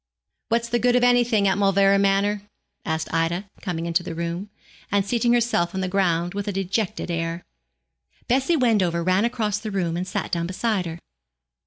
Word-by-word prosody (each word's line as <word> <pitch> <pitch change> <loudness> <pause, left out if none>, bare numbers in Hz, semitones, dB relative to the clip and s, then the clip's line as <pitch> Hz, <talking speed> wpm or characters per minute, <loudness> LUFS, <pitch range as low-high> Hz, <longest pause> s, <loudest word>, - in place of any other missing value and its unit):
'What's 235 +1 +1
the 240 0 0
good 245 +1 +3
of 250 - +3
anything 240 -4 +3
at 190 +1 +1
Mauleverer 195 0 +4
Manor?' 200 +1 +2 0.4
asked 160 0 -2
Ida, 165 +4 0 0.2
coming 170 -4 -3
into 170 +1 +1
the 175 - -6
room, 170 +4 -4 0.4
and 200 -1 +2
seating 235 +3 +1
herself 230 -8 +1
on 190 - -1
the 185 - -1
ground 175 -2 +1
with 205 0 -4
a - - 0
dejected 195 +1 -2
air. 165 +1 -3 0.8
Bessie 270 +7 +2
Wendover 195 - +2
ran 185 +4 +2
across 220 -4 -1
the 215 - -5
room 180 -5 -1
and 180 +2 -3
sat - - -3
down 170 -1 -1
beside 190 0 -1
her. 165 0 -6
195 Hz, 180 wpm, -23 LUFS, 175-220 Hz, 0.8 s, Mauleverer